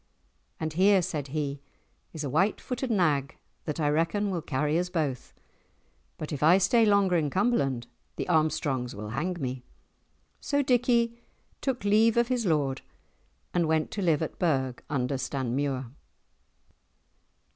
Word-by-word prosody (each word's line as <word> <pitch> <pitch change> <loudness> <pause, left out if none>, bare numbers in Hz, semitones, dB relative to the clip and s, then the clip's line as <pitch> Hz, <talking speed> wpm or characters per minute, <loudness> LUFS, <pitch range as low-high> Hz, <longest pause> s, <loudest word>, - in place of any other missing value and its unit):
"And 160 -1 -3
here," 190 +2 +4
said 145 -4 -3
he, 140 -1 -3 0.5
"is 160 -2 -6
a 140 - -2
white 190 +9 +2
footed 255 0 -4
nag 155 - +1 0.3
that 150 0 -3
I 150 - +1
reckon 165 +7 +1
will 175 -3 -2
carry 150 +3 0
us 180 0 -2
both. 150 -8 -2 0.9
But 155 0 -5
if 140 - -4
I 165 +5 +6
stay 220 +4 +4
longer 200 -3 +3
in 150 -3 0
Cumberland 140 - +1 0.3
the - - -4
Armstrongs 150 - 0
will 105 +1 -6
hang 170 +10 -2
me." 130 -2 -3 0.8
So 285 0 0
Dickie 235 -2 +2 0.4
took 260 -5 -2
leave 215 +3 +4
of 235 +1 +3
his 245 -5 0
lord 140 -5 +1 0.7
and 170 -2 +2
went 160 0 +1
to 205 - -3
live 165 -4 +2
at 160 - -6
Burgh 130 -7 0
under 130 -1 -1
Stanmuir. 130 0 -2
160 Hz, 145 wpm, -28 LUFS, 140-200 Hz, 0.9 s, I